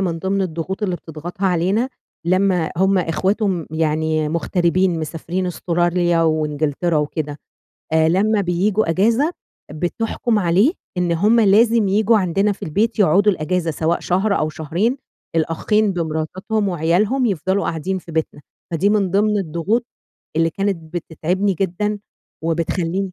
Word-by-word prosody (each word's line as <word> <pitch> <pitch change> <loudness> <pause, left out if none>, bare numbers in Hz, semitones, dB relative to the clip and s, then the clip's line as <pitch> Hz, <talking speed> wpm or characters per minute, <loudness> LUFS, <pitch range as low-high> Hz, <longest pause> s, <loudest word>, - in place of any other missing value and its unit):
من 175 -4 -1
ضِمن 195 +3 0
الضغوط 185 +3 -4
اللي 185 -4 0
بتضغطها 170 +5 -5
علينا، 190 +7 +1 0.4
لمّا 185 -2 +2
هم 190 +2 +3
إخواته 185 +6 0
م 175 -5 -2
يعني 155 0 0
مغتربين 170 +2 +1
مسافرين 165 +4 -3
أستراليا 175 -1 +1
وإنجلترا 155 +1 0
وكده 150 0 -2 0.5
آآ، 160 0 +4
لمّا 205 +5 +2
بييجوا 190 +2 +1
أجازة 230 - +2 0.4
بتحكُم 220 +7 -1
عليه، 195 - +3 0.3
إن 175 -1 +1
هم 210 +8 +3
لازم 220 +1 +4
ييجوا 215 +3 +3
عندنا 195 +2 +1
في - - -13
البيت 215 +9 0
يقعدوا 200 +2 +4
الأجازة 175 0 -1
سواء 160 +2 0
شهر 195 +3 +1
أو 155 - 0
شهرين، 170 - -1 0.4
الأخين 200 +6 +1
بمراتاتهم 180 +5 -2
وعيالهم 190 - +1
يفضلوا 190 0 0
قاعدين 180 +4 -2
في 170 -2 -12
بيتنا، 160 -2 -2 0.3
فدي 170 +5 +2
من 205 -3 +1
ضِمن 210 +2 +2
الضغوط، 195 +7 -1 0.5
اللي 165 0 +2
كانت 175 -3 -3
بتتعبني 180 +4 -1
جدًا، 200 +3 -1 0.5
وبتخلّيني 170 +3 -1
180 Hz, 130 wpm, -20 LUFS, 165-200 Hz, 0.5 s, آآ